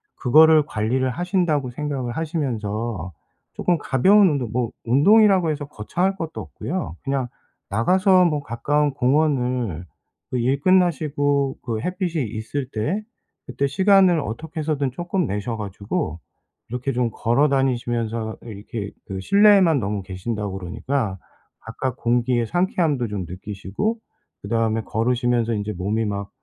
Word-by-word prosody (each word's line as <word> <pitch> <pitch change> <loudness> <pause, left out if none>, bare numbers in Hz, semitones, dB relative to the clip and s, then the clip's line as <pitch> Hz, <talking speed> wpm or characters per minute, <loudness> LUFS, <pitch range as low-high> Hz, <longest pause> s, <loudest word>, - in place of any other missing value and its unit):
그거를 155 +3 +6
관리를 125 +2 -1
하신다고 175 - 0
생각을 130 -2 -4
하시면서 115 - -3 0.4
쪼끔 175 -1 +1
가벼운 190 +9 +4
운동 135 -7 -1
뭐 120 -1 -1
운동이라고 185 - +5
해서 145 -1 -4
거창할 175 - -2
것도 165 -4 -5
없고요. 180 - -5
그냥 135 -2 -1 0.4
나가서 185 - +4
뭐 150 -4 0
가까운 145 +3 0
공원을 125 - +1 0.5
그 125 - -1
일 130 +4 +1
끝나시고 145 -6 +2
그 115 -3 -3
햇빛이 175 - -2
있을 115 +5 -4
때 155 - -1 0.4
그때 140 - -1
시간을 190 +3 +4
어떻게 155 +8 -6
해서든 145 -3 0
쪼끔 175 +5 -2
내셔 105 +4 -3
가지고 100 -5 -4 0.5
이렇게 125 +3 -3
좀 120 -2 0
걸어 125 +6 +2
다니시면서 120 -5 -1
이렇게 105 -1 -6 0.2
그 95 -1 -5
실내에만 200 - +5
너무 105 -2 -2
계신다고 95 +1 -4
그러니까 105 +3 -3 0.4
바깥공기의 120 0 -1
상쾌함도 165 -6 0
좀 100 -4 -4
느끼시고 100 - -4 0.4
그다음에 115 +1 0
걸으시면서 120 +1 0
인제 105 0 -3
몸이 105 +5 -1
막 100 -1 -3
125 Hz, 320 characters per minute, -22 LUFS, 110-155 Hz, 0.5 s, 그거를